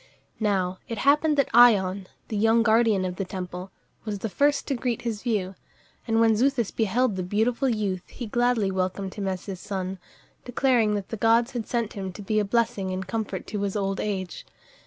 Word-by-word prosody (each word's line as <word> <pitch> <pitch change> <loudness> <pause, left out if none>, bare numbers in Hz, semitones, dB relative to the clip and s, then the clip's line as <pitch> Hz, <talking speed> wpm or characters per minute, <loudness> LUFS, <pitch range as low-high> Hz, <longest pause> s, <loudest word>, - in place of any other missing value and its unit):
Now 190 -4 0
it 230 - -4
happened 295 +5 +3
that 280 - +2
Ion, 200 -5 +5 0.2
the 220 - -3
young 225 +2 +4
guardian 220 -4 +3
of 180 0 -4
the 195 - -1
temple, 180 0 -6 0.3
was 210 -2 -3
the 220 +3 -4
first 285 +7 +1
to 280 - -1
greet 240 -2 -2
his 225 -3 -3
view, 205 -6 -1 0.5
and 225 -1 +2
when 225 -1 +4
Xuthus 245 -1 +1
beheld 225 +1 +1
the 185 - -2
beautiful 225 +8 0
youth, 200 -5 -2
he 245 - -7
gladly 240 -3 +1
welcomed 190 +1 -2
him 200 -2 -4
as 185 -1 -3
his 195 -3 -6
son, 190 -1 -4 0.4
declaring 245 -4 +2
that 200 -2 -4
the 225 - -4
gods 230 +3 +3
had 240 -4 -4
sent 235 -3 -2
him 190 -3 -5
to 205 - -9
be 215 +2 +1
a - - +2
blessing 220 -2 0
and 185 0 -3
comfort 200 -1 -4
to 210 -2 -4
his 200 0 -2
old 195 -1 -1
age. 190 -4 -3
210 Hz, 200 wpm, -25 LUFS, 190-235 Hz, 0.5 s, Ion